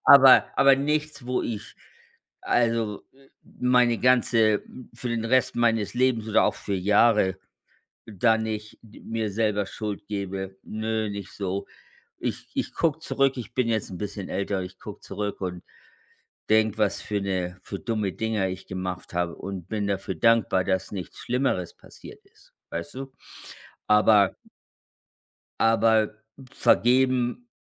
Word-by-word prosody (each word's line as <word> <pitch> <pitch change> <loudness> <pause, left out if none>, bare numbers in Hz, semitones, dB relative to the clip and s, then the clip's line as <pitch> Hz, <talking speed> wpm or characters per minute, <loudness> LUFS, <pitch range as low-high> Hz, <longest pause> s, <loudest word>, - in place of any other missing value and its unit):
Aber 135 -2 +9
aber 135 0 +6
nichts, 150 0 -2
wo 125 0 0
ich 105 -3 -5 0.7
also, 115 -3 0 0.4
meine 125 -1 +2
ganze 115 -4 +3 0.3
für 125 - -6
den 115 -1 -2
Rest 130 +2 +2
meines 115 -3 +1
Lebens 120 -3 +1
oder 110 - +4
auch - - +1
für 100 - -4
Jahre 100 0 +3 0.7
da 110 +2 +2
nicht 110 -1 -5
mir 110 0 -5
selber 105 -1 0
Schuld 105 -1 -6
gebe. 95 -1 -4
Nö, 110 0 -2
nicht 100 -2 -7
so. 100 0 -3 0.5
Ich - - -5
ich - - -2
gucke 160 -2 +1
zurück, 135 -4 +1
ich 120 -1 -7
bin 125 -2 +1
jetzt 110 -3 -1
'n 90 - -7
bisschen 100 -2 -5
älter 100 -1 -2
ich 90 +1 -10
gucke - - -9
zurück 105 -1 -5
und 90 -2 -4 0.9
denke, 110 0 +3
was 105 -2 0
für 105 -1 -2
'ne 90 -2 -2
für 100 - -7
dumme 110 -4 -2
Dinger 110 -2 -1
ich 95 0 -7
gemacht 90 -1 -5
habe 85 -1 -1
und 95 -3 -7
bin 105 -2 -2
dafür 95 -1 -2
dankbar, 110 -1 +3
dass 95 -1 -1
nichts 95 -3 -7
Schlimmeres 125 -8 -1
passiert - - -14
ist. - - -25 0.2
Weißt 85 +4 -6
du, 135 0 -7 0.7
aber 105 -2 +5 1.2
aber 110 -1 +3 0.4
vergeben, 130 - +2
110 Hz, 140 wpm, -25 LUFS, 95-120 Hz, 1.2 s, Aber